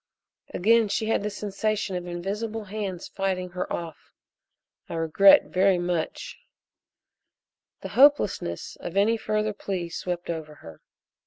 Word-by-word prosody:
Again 225 +4 +3
she 210 +2 -1
had 225 - +2
the 210 - -2
sensation 205 -1 -2
of 180 0 -4
invisible 210 +6 -4
hands 195 -3 -5
fighting 185 -2 -2
her 180 0 -4
off. 165 -2 -7 0.7
"I - - -5
regret 165 +5 +6
very 190 0 +3
much 175 -2 -3 0.7
" - - -60
The - - -6
hopelessness 260 - +2
of 175 - -6
any 215 +3 +4
further 215 -1 -1
plea 185 -4 -4
swept 175 +1 -4
over 155 -2 -6
her. 80 - -13
195 Hz, 135 wpm, -26 LUFS, 175-210 Hz, 0.7 s, regret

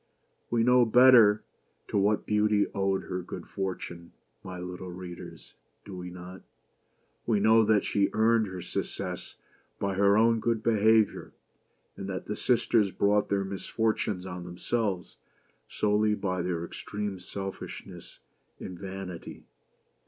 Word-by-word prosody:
We 115 -1 +2
know 125 +1 +5
better 120 -3 +6 0.5
to - - -4
what 105 +2 +1
Beauty 105 -1 +2
owed 95 -1 0
her 90 - -4
good - - -8
fortune, 90 -3 -5 0.3
my 95 -1 -7
little 90 +1 -7
readers 90 -1 -9 0.2
— - - -44
do 100 - -8
we 90 0 -6
not? 90 +1 -10 0.9
We 110 -3 +3
know 110 +2 +5
that 105 -1 +3
she 100 -1 +1
earned 110 0 +3
her 95 -1 -6
success - - -5 0.4
by 100 -1 -1
her 100 +2 +4
own 115 +1 +4
good 115 0 -1
behavior, 110 -1 +3 0.6
and 95 0 -6
that 95 -1 -4
the 105 - -3
sisters 115 -4 +2
brought 100 +2 +1
their 100 -1 0
misfortunes 100 -1 -2
on 90 -1 -6
themselves 90 +2 -3 0.5
solely 105 0 +1
by 95 -3 -2
their 85 -1 -2
extreme 105 +1 -5
selfishness 95 +1 -8 0.4
and 90 -2 -8
vanity. 95 -3 -7
100 Hz, 135 wpm, -28 LUFS, 95-110 Hz, 0.9 s, better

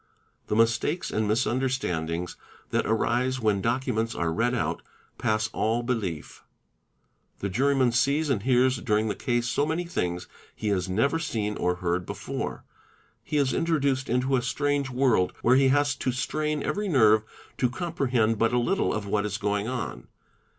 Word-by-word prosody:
The - - -1
mistakes 115 +9 +1
and 110 -1 0
mis 110 +5 +2
_ 110 - 0
understandings 90 -10 -2 0.4
that - - +1
arise 125 +3 +1
when 105 -4 +1
documents 115 -1 -1
are 85 -1 -1
read 120 +6 +1
out, 120 - -1 0.4
pass 110 0 +1
all 115 +1 0
belief. 105 - -3 0.5
' - - -44
The 100 - -1
juryman 130 +4 +2
sees 140 +5 +2
and 110 -7 +1
hears 130 +2 +3
during 110 -3 0
the - - -2
case 120 -1 -1
so 140 - +1
many 160 +3 -1
things 90 - -3 0.3
he 105 - -2
has 95 -2 0
never 125 +12 +1
seen 110 -9 -2
or 90 0 0
heard 90 0 -2
before; - - -5 0.6
he 150 - -2
is 140 -2 +2
introduced 140 -5 0
into 125 +3 +1
a 125 - +1
strange 140 +3 0
world 125 -8 +2
where 125 +2 +5
he 135 0 +5
has. 145 +1 +3
to 130 - -1
strain 150 +4 -2
every 205 0 -1
nerve 110 - +5 0.4
to 125 - +2
comprehend 125 - 0
but 115 +1 +2
a - - +3
little 185 +12 +1
of 105 -1 -3
what 100 +1 0
is 105 0 -2
going 105 0 -1
on. 125 -2 -4
120 Hz, 170 wpm, -26 LUFS, 105-135 Hz, 0.6 s, where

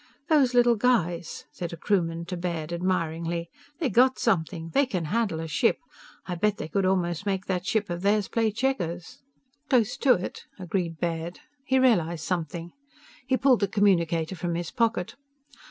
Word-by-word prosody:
"These 270 -5 +4
little 240 -1 +5
guys," 175 -8 0
said 175 -2 -5
a - - -6
crewman 170 -3 0
to 180 +1 -4
Baird, 170 -2 -3
admiringly, 170 -1 -2 0.3
"they 330 - 0
got 255 +5 +4
something. 165 -5 -1
They 280 -1 +3
can 180 -9 -2
handle 200 -2 0
a 165 - -4
ship! 160 +9 +2 0.5
I 180 - -4
bet 205 +4 0
they 150 - -5
could 185 +4 0
almost 180 0 0
make 190 -1 -1
that 185 0 -2
ship 210 -1 +1
of 175 0 -4
theirs 205 +1 +2
play 225 -1 +1
checkers!" 200 -8 -2 0.5
"Close 245 -2 +3
to 270 -2 +5
it," 180 - -6
agreed 180 -3 -3
Baird. 170 0 -3 0.2
He 265 - +2
realized 170 - +2
something. 170 +1 -3 0.6
He 260 - +2
pulled 260 -3 +4
the 200 - +1
communicator 175 -4 +2
from 175 -1 -3
his 170 0 -4
pocket. 230 -6 0
180 Hz, 170 wpm, -26 LUFS, 170-225 Hz, 0.6 s, little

